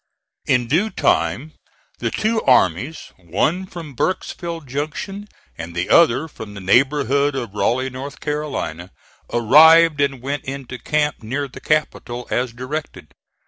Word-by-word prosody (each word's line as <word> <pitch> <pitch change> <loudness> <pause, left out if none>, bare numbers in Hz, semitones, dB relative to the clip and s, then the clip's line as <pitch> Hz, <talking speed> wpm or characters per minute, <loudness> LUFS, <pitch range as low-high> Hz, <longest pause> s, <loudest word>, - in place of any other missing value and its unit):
In 125 -1 +2
due 170 - +2
time 95 - 0 0.5
the - - -1
two 220 +1 0
armies, 125 - +1
one 150 - -1
from 165 -6 -9
Burkesville 170 +2 -3
Junction 155 +9 -5 0.3
and 85 0 -7
the 90 +1 -2
other 160 -2 +5
from 110 -8 -10
the - - -7
neighborhood 140 +6 +2
of 120 -6 -4
Raleigh, 130 +5 0
North 135 +3 -7
Carolina, 145 - -4 0.4
arrived 155 +6 +6
and 140 -2 0
went 140 +1 -3
into 130 -2 -6
camp 150 -1 -1
near 135 +6 -3
the 130 - -12
Capital, 125 -5 -1
as 125 0 0
directed. 130 +6 -6
140 Hz, 135 wpm, -20 LUFS, 120-155 Hz, 0.5 s, arrived